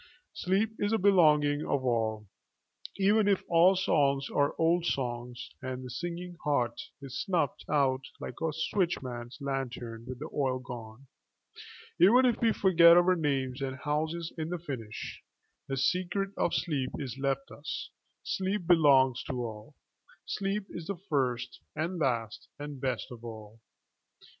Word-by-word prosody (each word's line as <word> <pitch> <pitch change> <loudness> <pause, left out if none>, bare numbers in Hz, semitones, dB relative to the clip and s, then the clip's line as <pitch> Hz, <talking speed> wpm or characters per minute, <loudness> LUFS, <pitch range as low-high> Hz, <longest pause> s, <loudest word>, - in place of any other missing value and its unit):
Sleep 205 - +1
is 205 +1 +1
a 225 - +3
belonging 150 -7 +4
of 135 -2 -1
all; 110 -3 0 0.7
even 205 +2 +4
if 200 -2 +2
all 175 +3 +5
songs 140 -7 +2
are 145 0 +1
old 170 +1 +3
songs 120 -5 -3
and 130 -1 -5
the 125 - -7
singing 175 +4 -5
heart 125 -5 0 0.2
is 135 0 -4
snuffed 170 -9 0
out 135 -3 +2 0.2
like - - -7
a 160 -1 +1
switchman's 135 -8 -2
lantern 125 -4 -4
with 130 -1 -6
the 150 +5 -7
oil 130 -3 +1
gone, 120 0 -9 0.9
even 240 +8 +7
if 240 -3 +2
we 230 -1 +4
forget 170 -4 +6
our 180 +1 +5
names 135 -4 -1
and 135 -1 -3
houses 160 +3 -2
in 160 0 -2
the 175 - -2
finish, 130 -10 -6 0.5
the 135 - -2
secret 185 +7 0
of - - 0
sleep 140 -6 -1
is 135 -2 -5
left 135 0 -1
us, 145 - -6 0.3
sleep 190 0 -1
belongs 140 -7 +5
to 140 - -4
all, 110 +6 -9 0.5
sleep 195 0 -2
is 170 -2 -7
the 200 - -3
first 125 -5 -1 0.2
and 165 +3 -2
last 115 -7 -1
and 145 -2 -7
best 130 -3 -2
of 120 -1 -10
all. 110 -1 -9
145 Hz, 150 wpm, -30 LUFS, 130-175 Hz, 0.9 s, even